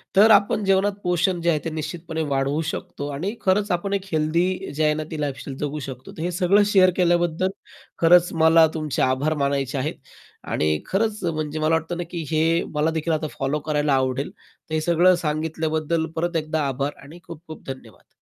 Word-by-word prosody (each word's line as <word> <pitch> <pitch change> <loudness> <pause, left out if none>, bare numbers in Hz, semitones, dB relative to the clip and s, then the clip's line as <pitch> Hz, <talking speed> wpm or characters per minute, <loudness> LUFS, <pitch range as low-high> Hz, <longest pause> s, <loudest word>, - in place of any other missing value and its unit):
तर 215 +3 +7
आपण 205 0 +4
जेवणात 195 +1 +3
पोषण 180 0 +1
जे 170 - +1
आहे 155 -3 +2
ते - - -1
निश्चितपणे 160 +1 -5
वाढवू 135 +3 0
शकतो. 150 -2 -5
आणि 175 +10 -3
खरंच 200 +1 +1
आपण 195 +3 -1
एक 195 -1 -1
हेल्थी 170 +4 0
जी 155 - 0
आहे 150 0 +3
ना 155 0 -3
ती 155 -2 -4
लाईफस्टाईल 135 -1 -4
जगू 150 +1 -3
शकतो. 130 -1 -8
तर 160 - -9
हे 175 +1 -1
सगळं 190 +3 +3
शेअर 185 -1 +6
केल्याबद्दल 175 0 +2 0.5
खरंच 175 +1 +6
मला 160 0 +7
तुमचे 155 -3 -2
आभार 130 +4 +1
मानायचे 140 -1 -1
आहेत 150 +5 -2 0.5
आणि 75 0 +1
खरंच 210 +1 -1
म्हणजे 155 -2 -2
मला 155 +1 +2
वाटतं 160 +2 -3
ना 175 - -2
की 170 -3 -4
हे 165 +2 +2
मला 150 +2 +1
देखील 160 +1 -1
आता 155 0 -1
फॉलो 140 +3 0
करायला 150 -1 0
आवडेल. 130 +1 0 0.4
तर - - -6
हे 155 - +1
सगळं 175 +2 +4
सांगितल्याबद्दल 160 +1 -1
परत 170 +1 -2
एकदा 155 -2 -1
आभार 140 +2 -2
आणि 155 +5 -12
खूप-खूप 165 -1 -11
धन्यवाद. 120 -8 -10
160 Hz, 190 wpm, -23 LUFS, 150-175 Hz, 0.5 s, तर